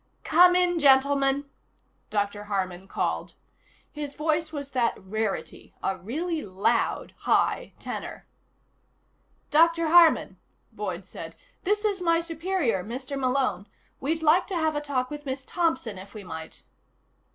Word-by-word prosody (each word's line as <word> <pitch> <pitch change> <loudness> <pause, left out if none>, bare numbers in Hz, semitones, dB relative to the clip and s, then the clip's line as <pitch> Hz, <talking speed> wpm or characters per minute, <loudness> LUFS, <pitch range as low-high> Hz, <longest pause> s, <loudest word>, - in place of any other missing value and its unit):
"Come 360 +2 +6
in, 355 -1 +3
gentlemen," 275 0 +4 0.6
Dr. 205 0 -2
Harman 190 -2 -3
called. - - -2 0.6
His 295 -1 -6
voice 315 +1 0
was 285 -3 -6
that 240 -3 +1
rarity, 210 +1 -4
a 190 - 0
really 310 - -3
loud 190 0 0
high - - +1
tenor. - - -6 1.3
"Dr. 335 +1 +4
Harman," 335 -1 +5 0.3
Boyd - - -5
said, - - -9 0.3
"this 415 +3 +1
is 400 -3 0
my 335 -1 +3
superior, 330 - -1
Mr. 255 +6 -5
Malone. 255 -7 0 0.3
We'd 320 +4 -1
like 325 +4 +4
to 385 - -3
have 315 -2 +1
a 295 - -1
talk 265 -3 -2
with 295 -1 -7
Miss 260 0 -4
Thompson, 260 - -1
if 195 +3 -12
we 210 - -7
might." 160 -3 -8
280 Hz, 130 wpm, -26 LUFS, 220-330 Hz, 1.3 s, Come